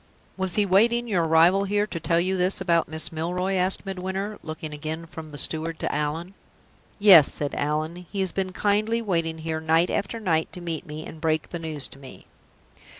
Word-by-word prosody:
"Was 190 -2 -1
he 210 - +3
waiting 235 +5 +3
your 185 -6 +1
arrival 170 +5 +4
here 205 +1 +1
to 185 -5 -6
tell 165 +1 +1
you 185 +2 0
this 185 +1 +1
about 170 -3 +2
Miss 160 0 +1
Milroy?" 180 +4 -2
asked 185 +1 0
Midwinter, 195 +2 -4
looking 155 -1 -7
again 155 +2 -5
from 160 -1 -10
the 145 - -9
steward 160 +2 0
to - - -3
Allan. 155 +5 -3 0.6
"Yes," 190 -8 +8
said 145 -1 -3
Allan. 155 +4 -2
"He 200 -1 -2
has 190 -2 -1
been 190 -1 -2
kindly 215 +4 0
waiting 165 -5 -1
here, 160 0 -4
night 160 +2 +2
after 205 +3 -2
night, 165 -7 0
to - - -7
meet 170 -3 -5
me, 155 +1 -7
and 155 - -10
break 160 -1 0
the 170 - -5
news 155 -4 -4
to 135 - -14
me." 135 -2 -12
170 Hz, 200 wpm, -25 LUFS, 160-190 Hz, 0.6 s, Yes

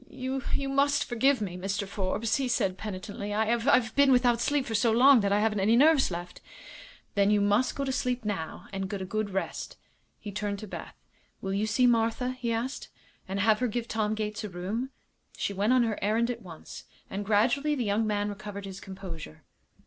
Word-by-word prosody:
"You 265 0 -4
you 275 -1 -1
must 280 +1 +2
forgive 260 +1 +2
me, 185 -4 -3
Mr. 195 +2 -2
Forbes," 200 +3 -1
he 270 -2 -1
said, 195 -6 +1
penitently; 205 +1 -5
"I 220 +2 +2
I've 235 -1 +2
been 280 -1 +5
without 245 -2 +4
sleep 285 -1 +1
for 225 - -4
so 225 +2 +3
long 255 +3 +7
that 200 -2 0
I 205 - +3
haven't 210 -1 +1
any 210 +4 +4
nerves 295 +2 +5
left." 175 0 -7 0.7
"Then 200 -1 +3
you 210 0 +4
must 205 +5 +2
go 280 - -2
to 265 - -1
sleep 250 -2 -1
now, 195 -6 -4
and 195 -1 -3
get 195 -1 -4
a - - -4
good 215 +2 -2
rest." 195 0 -4 0.4
He 205 - -7
turned 205 0 -3
to 215 - -8
Beth. - - -8 0.4
"Will 195 0 -3
you 205 +2 0
see 250 +4 +3
Martha," 230 +1 +2
he 250 -2 -3
asked, 235 +5 -3 0.4
"and 195 +1 -3
have 215 +1 +4
her 250 - +1
give 235 +1 -3
Tom 215 -1 -1
Gates 215 0 -3
a 210 - -4
room?" 195 +8 -3 0.5
She 200 - -2
went 200 +4 +1
on 255 -1 +5
her 225 -3 -1
errand 225 +4 +1
at 235 -1 -6
once, 170 -5 -10 0.2
and 200 +1 -4
gradually 245 +9 +2
the 250 -4 -1
young 210 +2 +1
man 205 -1 0
recovered 205 -1 -7
his 195 0 -7
composure. 185 - -9
215 Hz, 210 wpm, -28 LUFS, 200-245 Hz, 0.7 s, long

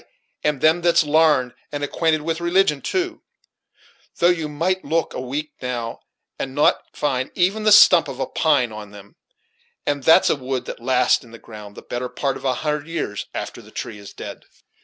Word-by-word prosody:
and 150 -3 0
them 160 +3 +4
that's 170 -1 +4
larned, 150 -5 +3 0.2
and 145 0 -4
acquainted 155 +1 0
with 165 +1 -2
religion, 170 -4 +2
too; 365 -2 -2 1.0
though 175 - +4
you 165 -4 -2
might 175 +6 -1
look 165 -1 -1
a - - -4
week, 145 +4 -4
now, 120 -3 -4 0.4
and 130 0 -4
not 150 - +3
find 130 -3 -1
even 190 +5 +1
the 215 - +5
stump 210 -5 +7
of - - -7
a - - 0
pine 140 -7 +1
on 105 -1 -8
them; 100 0 -14 0.7
and 145 -1 -1
that's 160 +5 +5
a - - +2
wood 130 -2 -4
that - - -7
lasts 125 0 +2
in 120 - -16
the 115 - -11
ground 105 -3 -12
the - - -11
better 125 +1 -4
part 135 +2 -2
of - - -10
a 130 -1 +1
hundred 150 0 -1
years 155 -11 -4
after - - -5
the - - -16
tree 115 -3 -7
is 100 - -11
dead." - - -9
145 Hz, 195 wpm, -21 LUFS, 125-165 Hz, 1.0 s, stump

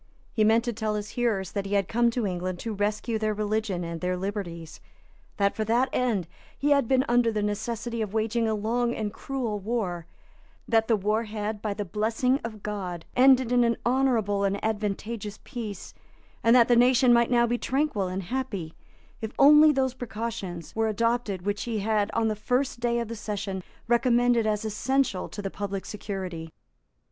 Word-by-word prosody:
He 220 - +2
meant 225 +2 +4
to 240 -1 -2
tell 215 -1 -2
his 210 0 -4
hearers 215 -6 -1
that 200 -1 -3
he 205 - -1
had 195 -2 +2
come 235 +1 +2
to 235 -1 -1
England 180 -1 -2
to 225 - -3
rescue 210 +2 -1
their 215 -1 0
religion 210 -3 -1
and 170 -1 -5
their 180 0 -1
liberties; 180 -4 -5 0.6
that, 200 0 +2
for 220 - -1
that 240 +4 +2
end, 220 -9 0 0.3
he 290 +1 +1
had 280 -4 +4
been 265 +1 +3
under 240 -1 +3
the 210 -1 -1
necessity 230 +3 -3
of 210 -3 -2
waging 225 +1 0
a 220 - +1
long 235 +3 0
and 215 -1 -3
cruel 240 -5 -3
war; 190 -6 -3 0.6
that 225 -1 +3
the 230 - +4
war 215 +3 0
had, 210 0 -4
by 210 -2 -2
the 205 - -3
blessing 225 +7 0
of 215 -3 -7
God, 185 -5 -4
ended 260 -1 +5
in 245 -1 +4
an 235 0 +2
honourable 235 -6 +2
and 200 0 +1
advantageous 210 0 -3
peace; 220 -7 -7 0.5
and 230 +1 +6
that 240 -2 +6
the 240 - +4
nation 245 +1 +5
might 235 0 +4
now 240 -1 +4
be 240 +1 -1
tranquil 265 -8 0
and 185 +1 -3
happy, 205 -8 -4 0.5
if 220 -1 -4
only 300 +2 +8
those 265 -3 0
precautions 225 -8 -5
were 225 0 +1
adopted 220 -3 0
which 205 +1 -2
he 230 -2 -2
had 210 0 +1
on 225 - +2
the 215 - 0
first 250 +4 -1
day 235 0 +1
of 235 -1 -2
the 230 - -5
session 205 -3 -4 0.3
recommended 240 -1 +3
as 210 0 0
essential 220 -1 0
to 205 - -7
the 195 - -3
public 200 -1 -4
security. 185 -6 -5
220 Hz, 190 wpm, -27 LUFS, 200-240 Hz, 0.6 s, only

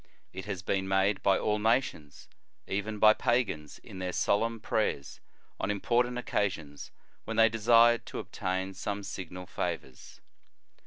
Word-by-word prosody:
It 95 - -7
has 100 -4 -5
been 95 0 -1
made 95 +1 +2
by 95 -1 +3
all 105 0 0
nation, 110 - 0 0.5
even 105 +2 -3
by 110 +1 +7
pagans, 105 - -1
in 95 - -11
their 90 -1 -3
solemn 115 +5 +1
prayers 105 -10 -2 0.4
on - - -2
important 120 +4 +1
occasions, 85 -11 -3 0.3
when 115 - -4
they 115 0 +6
desired 115 +2 +4
to - - -6
obtain 95 +1 -3
some 100 +1 -4
signal 90 -1 -7
favors. - - -5
100 Hz, 140 wpm, -30 LUFS, 95-115 Hz, 0.5 s, by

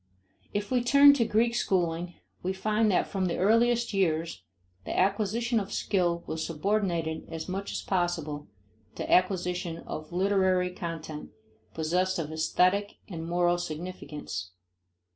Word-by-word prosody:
If 205 +2 -3
we 250 -2 +2
turn 280 +3 +8
to 250 -5 +2
Greek 225 +2 +2
schooling, 175 -5 0 0.3
we 185 +1 -1
find 215 +3 +1
that 185 - +3
from 190 -2 -2
the 170 - -2
earliest 230 +3 +3
years 165 - 0 0.4
the - - -4
acquisition 215 +5 +1
of 200 -2 -5
skill 175 -4 0
was 160 0 -3
subordinated 170 -2 -1
as 160 -1 -5
much 195 +2 -4
as - - -4
possible 170 -5 -1 0.5
to - - -4
acquisition 180 -2 +1
of 155 +1 -6
literary 185 -1 +2
content 165 -4 -6 0.5
possessed 180 +4 0
of 160 -2 -3
aesthetic 185 +5 +1
and 165 -3 -5
moral 175 0 +2
significance. 155 - -6
180 Hz, 135 wpm, -28 LUFS, 165-205 Hz, 0.5 s, turn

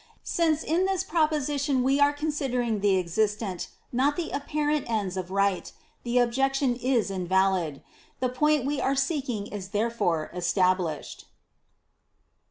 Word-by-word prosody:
Since 320 -2 +1
in 340 +4 +1
this 385 -2 0
propo 315 -1 +1
sition 285 -2 0
we 270 +2 +2
are 285 0 +5
considering 270 -7 -1
the 200 -1 +3
existent, 200 +1 -1 0.3
not 270 +4 +2
the 345 -2 -3
apparent 295 0 -1
ends 205 -5 -1
of 185 -1 -4
Right, 195 -1 0 0.3
the 240 +1 -1
objection 265 +2 +2
is 245 -4 0
in 185 -2 -3
valid. 185 -6 +1 0.4
The 255 - +1
point 295 +2 +2
we 285 0 -1
are 275 - +1
seeking 270 -7 -1
is 205 -3 -6
therefore 205 -7 0
established. 180 -2 0
245 Hz, 140 wpm, -27 LUFS, 195-290 Hz, 0.4 s, are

